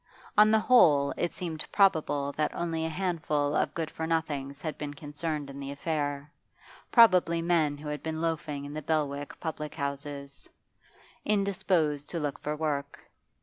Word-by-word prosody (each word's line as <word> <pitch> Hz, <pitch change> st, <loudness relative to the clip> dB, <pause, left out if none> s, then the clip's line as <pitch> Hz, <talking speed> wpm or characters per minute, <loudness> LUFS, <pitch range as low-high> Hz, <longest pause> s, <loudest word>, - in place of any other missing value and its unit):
On 210 Hz, 0 st, +7 dB
the 220 Hz, -, +5 dB
whole, 155 Hz, -, +5 dB
it 175 Hz, -, -1 dB
seemed 160 Hz, -3 st, -4 dB
probable 155 Hz, -8 st, +3 dB
that 150 Hz, +1 st, -1 dB
only 165 Hz, -1 st, -1 dB
a -, -, -3 dB
handful 155 Hz, -4 st, -1 dB
of -, -, 0 dB
good 160 Hz, -2 st, -3 dB
for 160 Hz, -, -4 dB
nothings 145 Hz, -4 st, -2 dB
had 155 Hz, -2 st, -3 dB
been 145 Hz, -1 st, -6 dB
concerned 150 Hz, 0 st, -4 dB
in 140 Hz, 0 st, -9 dB
the 140 Hz, 0 st, -5 dB
affair, 145 Hz, -1 st, -3 dB, 0.6 s
probably 185 Hz, -8 st, +6 dB
men 165 Hz, -4 st, +2 dB
who 150 Hz, +1 st, -9 dB
had 150 Hz, -1 st, -4 dB
been 160 Hz, 0 st, -3 dB
loafing 155 Hz, -3 st, -2 dB
in 145 Hz, -, -7 dB
the 155 Hz, -, -4 dB
Belwick 145 Hz, -2 st, -2 dB
public 150 Hz, -2 st, -5 dB
houses, 140 Hz, -1 st, -5 dB, 0.7 s
indisposed 180 Hz, -8 st, +1 dB
to 170 Hz, -, -3 dB
look 145 Hz, -3 st, -3 dB
for 150 Hz, +1 st, -3 dB
work. 145 Hz, -2 st, -3 dB
155 Hz, 160 wpm, -29 LUFS, 145-165 Hz, 0.7 s, On